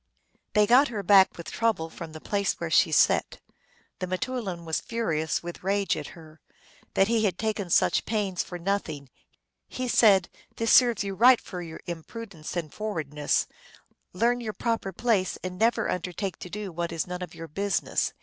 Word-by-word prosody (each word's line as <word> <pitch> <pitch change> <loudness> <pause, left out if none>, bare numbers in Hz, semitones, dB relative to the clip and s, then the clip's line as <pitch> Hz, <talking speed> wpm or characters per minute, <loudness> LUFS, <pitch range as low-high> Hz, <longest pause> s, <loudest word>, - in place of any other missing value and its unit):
They 210 0 +5
got 250 +6 +6
her 215 -5 -4
back 195 0 +5
with 170 - -8
trouble 225 -8 0
from 165 -1 -8
the 155 - -9
place 200 +3 0
where 170 -1 -5
she 160 - +4
sat. 150 - +3 0.6
The 185 - -3
m 185 - +1
teoulin 210 -8 -4
was 160 -1 -1
furious 165 -11 -1
with 175 0 -7
rage 200 -1 +1
at 150 +2 -7
her, 160 -1 -15 0.5
that 195 - +4
he 225 -1 +2
had 185 -3 0
taken 215 -4 -2
such - - +3
pains 200 -5 -1
for 180 - -6
nothing. 170 -7 -3 0.6
He 255 0 -4
said, 200 -6 +5 0.2
" - - -35
This 230 -1 +1
serves 240 -5 +5
you 200 -1 -3
right 245 +5 +6
for 180 -2 -7
your 165 -2 -8
impudence 175 0 -7
and 160 -4 -4
forwardness. 155 -9 -1 0.7
Learn 240 +6 +1
your 220 -2 -4
proper 230 -4 -2
place, 200 -2 0
and 180 0 -5
never 230 +2 +2
undertake 180 +2 -3
to 180 - -8
do 205 0 -5
what 170 0 -3
is 165 -1 -2
none 180 0 -6
of 180 - -7
your 165 - -8
business." 200 +6 -1
190 Hz, 185 wpm, -27 LUFS, 170-220 Hz, 0.7 s, got